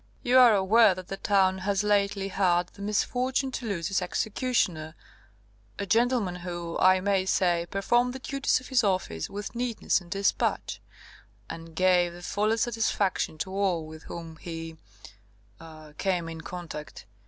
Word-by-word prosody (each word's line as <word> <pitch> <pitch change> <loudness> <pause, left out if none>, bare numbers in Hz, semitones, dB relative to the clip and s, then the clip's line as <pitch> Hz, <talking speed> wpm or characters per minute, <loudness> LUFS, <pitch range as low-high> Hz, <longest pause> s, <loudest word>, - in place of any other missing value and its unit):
You 250 +1 +5
are 240 -4 +7
aware 200 +1 +5
that 185 -1 -9
the 195 - -4
town 190 -2 +2
has 200 +1 0
lately 200 -1 +1
had 180 -2 +1
the - - -15
misfortune 255 +6 0
to 245 -2 -5
lose 175 -4 -2
its 195 - +1
executioner, 180 - -1 0.8
a - - -3
gentleman 225 -3 +1
who, 175 -1 -6
I 185 0 +5
may 190 -1 +1
say, 175 -3 +1
performed 240 +5 +1
the - - -5
duties 275 +1 0
of 255 - -12
his 255 -3 +3
office 185 - -1
with 205 +3 -6
neatness 235 -4 0
and 175 - -15
dispatch, 200 +2 -1 0.7
and 165 0 -9
gave 180 -1 +3
the 175 0 -11
fullest 215 +4 0
satisfaction 215 -8 -1
to 190 +4 -4
all 190 -4 0
with 155 0 -11
whom 165 -1 -8
he 165 -1 -7 0.9
er 155 -2 -13
came 180 -4 0
in 165 -1 -7
contact. 165 -6 -8
190 Hz, 155 wpm, -27 LUFS, 175-215 Hz, 0.9 s, are